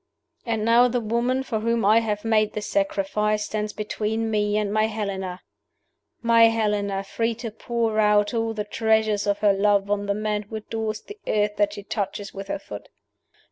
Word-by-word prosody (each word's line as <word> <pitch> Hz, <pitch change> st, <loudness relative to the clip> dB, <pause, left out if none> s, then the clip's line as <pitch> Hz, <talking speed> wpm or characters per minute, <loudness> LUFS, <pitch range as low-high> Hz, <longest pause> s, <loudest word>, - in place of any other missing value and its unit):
"And 225 Hz, -2 st, -1 dB
now 235 Hz, +2 st, +6 dB
the 245 Hz, 0 st, 0 dB
woman 240 Hz, +4 st, 0 dB
for 230 Hz, -4 st, -2 dB
whom 230 Hz, 0 st, 0 dB
I 215 Hz, +3 st, +6 dB
have 210 Hz, -1 st, -3 dB
made 215 Hz, -1 st, +2 dB
this 210 Hz, -1 st, -4 dB
sacrifice 210 Hz, +2 st, 0 dB
stands 215 Hz, 0 st, -3 dB
between 220 Hz, +1 st, -2 dB
me 210 Hz, -1 st, +1 dB
and 210 Hz, -1 st, -1 dB
my 215 Hz, 0 st, +3 dB
Helena 195 Hz, -4 st, -4 dB, 0.8 s
my 230 Hz, 0 st, +6 dB
Helena, 210 Hz, -3 st, 0 dB
free 230 Hz, +3 st, -1 dB
to 230 Hz, -1 st, -6 dB
pour 225 Hz, 0 st, -1 dB
out 210 Hz, +1 st, +3 dB
all 225 Hz, -1 st, -1 dB
the 210 Hz, -, -2 dB
treasures 220 Hz, -1 st, +1 dB
of 200 Hz, 0 st, +2 dB
her 205 Hz, -2 st, +5 dB
love 200 Hz, 0 st, +2 dB
on 205 Hz, 0 st, 0 dB
the 200 Hz, -, 0 dB
man 210 Hz, 0 st, -1 dB
who 210 Hz, +2 st, -9 dB
adores 220 Hz, 0 st, -4 dB
the 415 Hz, +1 st, -12 dB
earth 210 Hz, 0 st, +1 dB
that 205 Hz, 0 st, +2 dB
she 205 Hz, -1 st, -8 dB
touches 200 Hz, -1 st, -4 dB
with 195 Hz, 0 st, -7 dB
her -, -, -2 dB
foot! 105 Hz, -, -10 dB
215 Hz, 185 wpm, -24 LUFS, 205-225 Hz, 0.8 s, now